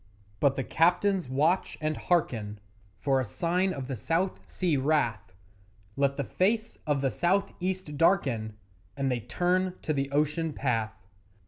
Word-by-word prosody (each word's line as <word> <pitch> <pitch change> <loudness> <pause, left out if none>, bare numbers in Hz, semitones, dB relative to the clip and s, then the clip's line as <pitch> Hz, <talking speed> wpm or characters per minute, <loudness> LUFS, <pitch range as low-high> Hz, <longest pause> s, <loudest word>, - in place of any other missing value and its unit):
But 140 -2 +3
the 135 - -1
captains 180 +2 +2
watch 155 +8 +1
and 155 0 -1
hearken 110 - 0 0.4
For 135 -2 +1
a - - +1
sign 180 - 0
of 135 -6 -5
the 135 - -3
South 165 - -1
Sea 175 -5 0
wrath 130 -9 0 0.6
Let 140 0 +1
the 140 - 0
face 220 - 0
of 145 -2 +1
the 135 -2 +1
South 185 - +1
east 185 -5 -3
darken, 120 - +2 0.4
And 135 -1 0
they 125 - 0
turn 180 - 0
to 155 - 0
the 135 -1 -1
ocean 150 +2 0
path. 110 -7 -2
150 Hz, 150 wpm, -28 LUFS, 130-180 Hz, 0.6 s, But